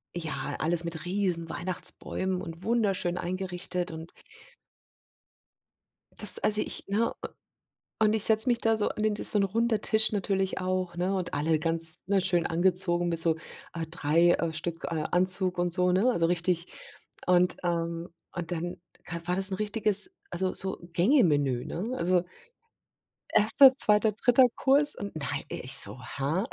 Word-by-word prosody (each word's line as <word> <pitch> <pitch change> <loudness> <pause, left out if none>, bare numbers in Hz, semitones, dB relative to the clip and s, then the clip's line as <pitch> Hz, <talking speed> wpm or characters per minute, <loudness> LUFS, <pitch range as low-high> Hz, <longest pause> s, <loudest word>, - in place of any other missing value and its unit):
ja, 160 -3 -4
alles 170 +2 0
mit 170 0 -6
riesen 180 -3 -2
Weihnachtsbäumen 185 +1 -2
und 165 -1 -9
wunderschön 195 -6 -1
eingerichtet 180 0 -4
und 160 +1 -9 2.1
das - - +5
also 210 0 0
ich - - -5
ne 215 +4 0
u - - -9 0.7
und 215 -1 +3
ich 220 - 0
setze 220 +3 +3
mich 240 -1 +2
da 225 -1 +1
so 210 - 0
an 215 - -5
den 215 -1 +1
das 205 - 0
so 210 - +2
'n - - +2
runder 225 +2 0
Tisch 220 +1 +1
natürlich 195 -2 -1
auch 185 -1 -3
ne 180 +2 -1
und 185 -2 -3
alle 155 +2 0
ganz, 165 +1 +4
ne, 195 0 +1
schön 175 -2 0
angezogen 175 0 +1
mit 165 -1 -1
so, 165 -1 +1 0.4
äh, 165 -1 -4
3, 165 +1 +2
äh, 165 -1 -2
Stück 165 +1 -6
äh, 160 -2 -3
Anzug 185 0 +1
und 175 0 -1
so, 180 0 +2
ne, 200 +8 +2
also 165 -7 +1
richtig 175 0 0 0.6
und, 180 0 +3
ähm 170 0 -2 0.3
und 175 0 -5
dann 175 +1 -4 0.3
k 170 -1 -6
war 180 0 0
das 190 +1 +7
'n - - -2
richtiges 215 - +3 0.2
also 185 +1 -2
so 190 0 -4
Gänge 205 - +3
Menü, 140 -6 0
ne? 205 +8 -5
Also 180 -2 +1 1.1
erster, 255 +5 +5
zweiter, 210 -2 +2
dritter 245 +4 +4
Kurs 285 +2 +4
und 200 0 -7
nei 145 -2 -4
ich 130 +2 -3
so: 130 - -3
„Hä?" 145 - -3
Also,. - - -12
180 Hz, 165 wpm, -27 LUFS, 170-205 Hz, 2.1 s, das